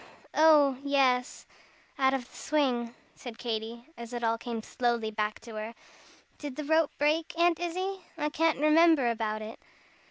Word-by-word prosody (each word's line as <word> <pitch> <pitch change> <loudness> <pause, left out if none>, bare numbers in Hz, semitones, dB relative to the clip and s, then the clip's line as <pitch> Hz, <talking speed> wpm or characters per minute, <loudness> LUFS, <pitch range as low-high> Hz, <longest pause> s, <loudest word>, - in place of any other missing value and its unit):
Oh, 295 -4 +5
yes 265 -3 +1 0.5
out 265 0 +3
of 250 -3 -5
the - - -20
swing," 250 -6 -1 0.2
said 240 -3 -10
Katy, 230 0 -4
as 235 0 -9
it 240 -1 -4
all 225 0 +2
came 230 -1 -5
slowly 235 -3 -1
back 210 0 -2
to 230 -1 -11
her. 220 +2 -6 0.6
"Did 290 -3 -6
the 305 - -4
rope 315 +1 +2
break, 310 +3 0
Aunt 340 -1 +3
Izzie? 370 +3 -3 0.2
I 300 -1 -1
can't 325 +1 +1
remember 305 -3 +4
about 215 -1 -3
it." 220 +1 -9
260 Hz, 160 wpm, -29 LUFS, 230-305 Hz, 0.6 s, Oh